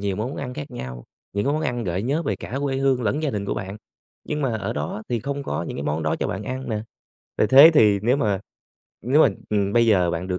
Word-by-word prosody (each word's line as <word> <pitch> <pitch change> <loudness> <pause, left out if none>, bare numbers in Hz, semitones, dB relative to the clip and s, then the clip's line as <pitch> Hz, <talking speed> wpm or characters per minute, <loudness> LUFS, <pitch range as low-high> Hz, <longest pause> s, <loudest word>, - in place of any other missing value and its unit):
nhiều 100 -1 -2
món 120 +6 -3
ăn 125 -2 -5
khác 145 -1 -7
nhau, 65 - -7 0.3
những 100 +1 -1
cái 140 - +1
món 155 +1 -1
ăn 120 -6 -2
gợi 90 +2 -2
nhớ 145 +7 0
về 105 - -2
cả 125 +7 -5
quê 135 -2 -1
hương 135 -2 +1
lẫn 140 +8 0
gia 150 - 0
đình 105 -3 -3
của - - -2
bạn, 95 +1 -5 0.5
nhưng 150 -1 -3
mà 120 -4 0
ở - - -3
đó 75 +9 -4
thì 120 -3 -1
không 140 +2 -4
có 75 - -3
những - - -5
cái 70 - -4
món 75 +2 -1
đó 80 - 0
cho - - 0
bạn - - -4
ăn 130 0 -5
nè. 105 -1 -2 0.6
Vậy 110 - +4
thế 140 +7 +9
thì 105 -7 +5
nếu 125 +5 +3
mà 100 -8 0 0.6
nếu 135 +7 +4
mà, - - +6 0.2
ừm, 100 -2 +1
bây 115 +1 +4
giờ 90 -6 +3
bạn 85 +2 -3
được 90 0 -1
110 Hz, 270 wpm, -23 LUFS, 100-135 Hz, 0.6 s, thế